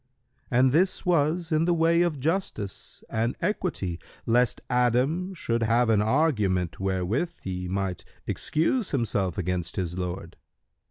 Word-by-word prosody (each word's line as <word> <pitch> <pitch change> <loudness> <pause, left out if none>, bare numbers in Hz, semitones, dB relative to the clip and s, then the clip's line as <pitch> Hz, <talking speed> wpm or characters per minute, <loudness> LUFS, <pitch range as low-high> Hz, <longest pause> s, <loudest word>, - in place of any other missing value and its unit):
And 125 +1 +4
this 180 +7 +2
was 170 0 +1
in 155 +1 +3
the 175 0 +3
way 165 +1 +3
of 170 -5 +1
justice 150 - -3
and 115 +2 -1
equity, 100 - -2 0.3
lest 120 0 +2
Adam 130 +10 +1
should 115 -8 -1
have 115 +1 +3
an 105 -2 +4
argument 105 - +1
wherewith 95 - -1
he 90 -1 -4
might 95 -1 -2 0.2
excuse 185 +8 0
himself 100 - 0
against 90 -2 -2
his 90 -1 -2
Lord. 90 -1 -5
120 Hz, 130 wpm, -26 LUFS, -, 0.3 s, And